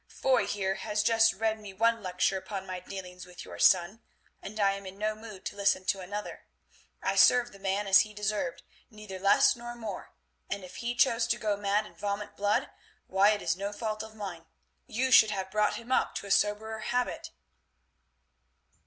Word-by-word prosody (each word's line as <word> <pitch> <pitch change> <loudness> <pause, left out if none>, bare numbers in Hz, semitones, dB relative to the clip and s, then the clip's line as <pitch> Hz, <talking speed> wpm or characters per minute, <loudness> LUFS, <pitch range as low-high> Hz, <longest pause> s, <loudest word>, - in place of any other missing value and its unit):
"Foy 260 -2 +1
here 195 -2 -1
has 210 -1 -1
just 225 0 +4
read 220 +1 -1
me 205 -2 -10
one 230 +3 +2
lecture 185 0 0
upon 190 0 -5
my 185 -1 -5
dealings 180 -1 -9
with 180 -1 -10
your - - -10
son, 190 +5 +4 0.4
and 215 +2 -8
I 200 -1 +4
am 195 0 -6
in 190 +1 -9
no 215 +1 -1
mood 215 -3 -11
to - - -4
listen 195 -2 +1
to 195 - 0
another. 205 +3 -6 0.6
I - - 0
served 245 -2 +5
the 195 - -14
man 195 +1 -1
as 195 -1 +7
he 215 - +1
deserved, 210 +5 -3 0.3
neither 210 -4 -9
less 200 +1 +5
nor 240 0 -8
more, 220 -5 -7 0.4
and 200 -1 -4
if 180 0 -10
he 240 +1 -3
chose 240 -2 +3
to 235 - +1
go 215 -3 0
mad 205 +1 0
and - - -15
vomit 205 0 -4
blood, 210 +7 0 0.3
why 195 +2 +4
it 210 -1 0
is 165 0 +1
no 200 +2 -4
fault 215 0 -4
of 220 0 -10
mine. 185 -6 -7 0.4
You 260 +4 -1
should 220 -2 +8
have 190 -2 -4
brought 210 0 +1
him 235 +2 -9
up - - +1
to - - -4
a 200 - -6
soberer 220 +2 +1
habit." 245 +3 -2
210 Hz, 195 wpm, -29 LUFS, 195-220 Hz, 0.6 s, should